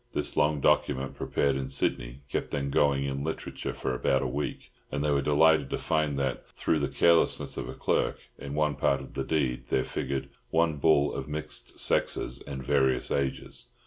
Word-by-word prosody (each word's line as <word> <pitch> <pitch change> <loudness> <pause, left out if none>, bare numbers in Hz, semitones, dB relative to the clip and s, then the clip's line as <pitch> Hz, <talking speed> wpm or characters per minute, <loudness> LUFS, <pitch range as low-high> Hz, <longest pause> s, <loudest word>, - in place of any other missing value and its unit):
This - - -2
long 75 -1 +2
document, 65 -1 +2
prepared 70 -1 0
in 65 -1 -2
Sydney, 65 -1 -2
kept - - -2
them 70 -1 -2
going 70 -1 +3
in 70 0 -2
literature 80 +1 -4
for 65 - -2
about 65 +2 +1
a - - 0
week; 70 +4 -4 0.2
and 70 - -1
they 75 - +2
were 70 -1 +2
delighted 75 0 +4
to - - -1
find 75 -3 0
that, 65 -3 -2
through - - +1
the - - 0
carelessness 85 -1 +2
of - - -5
a - - -6
clerk, - - 0 0.2
in 70 0 -6
one 75 -1 +2
part 70 -1 +1
of 70 - -10
the 70 - -2
deed 65 -5 -1
there 65 - +1
figured 65 0 -3 0.2
"one 80 -2 +2
bull 75 -1 +3
of - - -4
mixed 75 -1 -5
sexes 60 - +1
and 65 -2 -6
various 65 -1 +2
ages." 70 -1 -2
70 Hz, 190 wpm, -28 LUFS, 65-75 Hz, 0.2 s, delighted